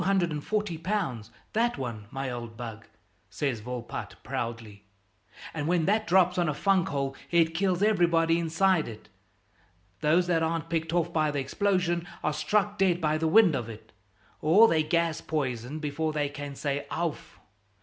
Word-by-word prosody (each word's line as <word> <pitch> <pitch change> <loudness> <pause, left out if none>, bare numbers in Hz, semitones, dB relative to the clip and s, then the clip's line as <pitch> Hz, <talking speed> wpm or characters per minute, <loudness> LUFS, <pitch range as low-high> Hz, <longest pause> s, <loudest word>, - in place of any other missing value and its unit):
that 235 +2 +1
one, 115 -5 -5
my 135 +1 -4
old 120 -2 -7
bug," 115 -2 -7 0.4
says 135 -6 -2
Volpatte 120 +1 -6
proudly, 115 -3 -5 0.7
"and 145 - -3
when 170 -2 +2
that 215 +2 +1
drops 180 0 +4
on 170 -3 +2
a 150 - -2
funk 190 +2 +2
hole 140 -1 -2
it 165 -1 +3
kills 185 +2 +1
everybody 170 -5 +3
inside 170 +1 +2
it. 110 -1 -10 0.9
Those 165 - +3
that 170 -2 +1
aren't 165 0 -2
picked 165 -1 -1
off 170 0 0
by 155 -1 +2
the 145 - -3
explosion 175 +3 0 0.2
are 150 - +1
struck 205 +5 0
dead 185 -3 +3
by 155 -2 +1
the 160 - +1
wind 180 0 +6
of 115 -3 -3
it, 110 0 -11 0.5
or 190 +9 +6
they're 160 -7 +3
gas 170 +1 0
poisoned 135 -1 -3
before 155 +1 -1
they 145 -2 0
can 145 -1 -7
say 140 0 -3
'ouf!'" 165 -2 -4
160 Hz, 155 wpm, -28 LUFS, 135-175 Hz, 0.9 s, wind